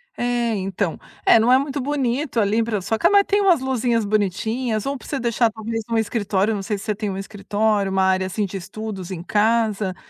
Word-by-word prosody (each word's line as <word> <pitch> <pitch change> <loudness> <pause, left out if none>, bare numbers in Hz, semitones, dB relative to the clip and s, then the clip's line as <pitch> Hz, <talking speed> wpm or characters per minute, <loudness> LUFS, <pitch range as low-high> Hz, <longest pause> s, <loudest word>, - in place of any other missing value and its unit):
É, 240 -1 0
então 190 -2 -2 0.3
é, 230 - +7
não 230 +3 +3
é 255 - +7
muito 275 0 -2
bonito 270 -1 -1
ali 215 +2 +2
pra 220 -3 -1
só 220 +4 -2
que - - +4 0.2
tem 405 +1 +1
umas 360 -7 +4
luzinhas 245 -4 0
bonitinhas 215 +3 -1
ou 275 - -1
pra 260 - -11
você 280 - -2
deixar 235 -1 +2
talvez 225 +1 -4
no 230 - +1
escritório, 210 -1 0
não 200 - -3
sei 205 +1 -2
se 200 - -9
você 215 -1 -1
tem 205 0 -4
um 190 - -4
escritório, 205 0 -1
uma 190 0 +2
área 190 0 +2
assim 200 +3 -1
de 195 0 -7
estudos 195 0 -6
em 175 -2 -6
casa, 215 -2 +1
220 Hz, 215 wpm, -22 LUFS, 200-240 Hz, 0.3 s, é